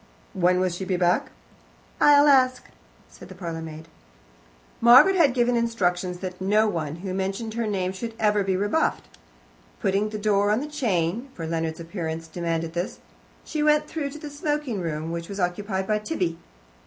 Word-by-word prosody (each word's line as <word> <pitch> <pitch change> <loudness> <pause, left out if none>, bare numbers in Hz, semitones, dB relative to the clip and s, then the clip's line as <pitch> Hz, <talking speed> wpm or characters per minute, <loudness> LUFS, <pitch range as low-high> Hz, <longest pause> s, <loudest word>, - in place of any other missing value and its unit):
"When 180 0 +2
will 185 0 +2
she 175 +2 -5
be 185 -1 -1
back?" 175 0 +1 0.7
"I'll 290 0 +6
ask," 255 -3 +4 0.4
said - - -14
the 185 - -10
parlourmaid. 165 -3 -7 0.9
Margaret 255 +11 +8
had 295 -8 +4
given 245 0 +2
instructions 185 -6 -1
that 185 -1 -6
no 210 +3 +3
one 160 -6 -3
who 185 - -3
mentioned 195 +4 -3
her 230 -1 -2
name 190 -3 -1
should 225 +4 -6
ever 210 -2 +2
be 190 -1 0
rebuffed. 205 - 0 0.7
Putting 200 +2 +1
the 215 - -5
door 205 -1 +2
on 210 +2 +2
the 285 - -4
chain 230 - -1
for 165 - -5
Leonard's 160 0 -2
appearance 165 -2 -5
demanded 165 -1 -3
this 175 +2 -3 0.5
she 310 - -3
went 300 0 +3
through 300 -3 -3
to 290 - -9
the 295 -1 -8
smoking 290 -7 -2
room, 160 -1 -3
which 170 0 -5
was 200 0 -6
occupied 190 +2 -1
by 215 +1 0
Tibby. 185 - -2
195 Hz, 170 wpm, -25 LUFS, 175-235 Hz, 0.9 s, Margaret